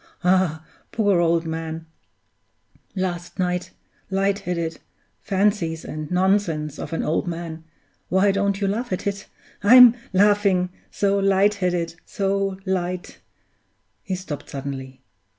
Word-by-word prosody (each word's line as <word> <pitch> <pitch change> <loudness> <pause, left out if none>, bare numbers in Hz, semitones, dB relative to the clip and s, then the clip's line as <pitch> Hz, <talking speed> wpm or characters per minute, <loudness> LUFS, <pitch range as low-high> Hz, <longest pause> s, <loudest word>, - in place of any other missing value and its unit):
Ah, 180 -4 +2 0.3
poor 205 -5 +2
old 170 -1 +2
man 160 0 -4 1.1
last 180 -2 -3
night 180 -1 -1 0.4
light 195 +1 +1
headed 170 -4 -3 0.4
fancies 190 -5 0
and 155 -1 -6
nonsense 180 -5 +1
of - - -6
an 165 - -1
old 160 +3 0
man 165 -1 -5 0.5
why 190 +2 +4
don't 200 0 0
you 200 - +1
laugh 225 +4 -2
at 185 - -3
it? 200 0 -3 0.3
I'm 245 +3 +9 0.2
laughing 200 -2 +3 0.2
so 200 0 +1
light 195 +1 +3
headed, 180 -4 -1
so 195 -2 -1
light 180 -1 -3 0.4
" - - -47
He 190 -4 -3
stopped 180 -6 -7
suddenly. 135 -1 -6
185 Hz, 125 wpm, -23 LUFS, 165-200 Hz, 1.1 s, I'm